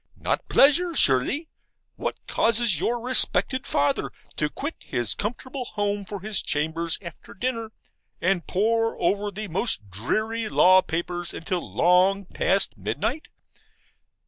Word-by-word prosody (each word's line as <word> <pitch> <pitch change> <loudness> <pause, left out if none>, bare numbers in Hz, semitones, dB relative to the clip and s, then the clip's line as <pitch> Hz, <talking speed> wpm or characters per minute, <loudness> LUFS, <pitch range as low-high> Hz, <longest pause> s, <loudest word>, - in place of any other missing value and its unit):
not - - -3
pleasure, 335 +5 +4
surely. 195 - +3 0.5
What - - -3
causes 230 -7 +2
your 240 +1 -1
respected 255 +1 +4
father 145 0 0 0.3
to - - 0
quit - - -5
his 120 -2 -1
comfortable 250 +4 -5
home 205 -1 -2
for 200 -1 -7
his 210 0 -1
chambers, 160 +2 0
after 170 - -11
dinner, 230 0 -3 0.5
and 180 -1 0
pore 225 +4 0
over 200 +4 0
the 210 +1 -6
most 165 - 0
dreary 215 - -2
law 185 -1 +5
papers 175 0 -4
until 175 +1 -4
long 185 +3 +3
past - - +2
midnight? 315 - -3
205 Hz, 125 wpm, -24 LUFS, 175-230 Hz, 0.5 s, law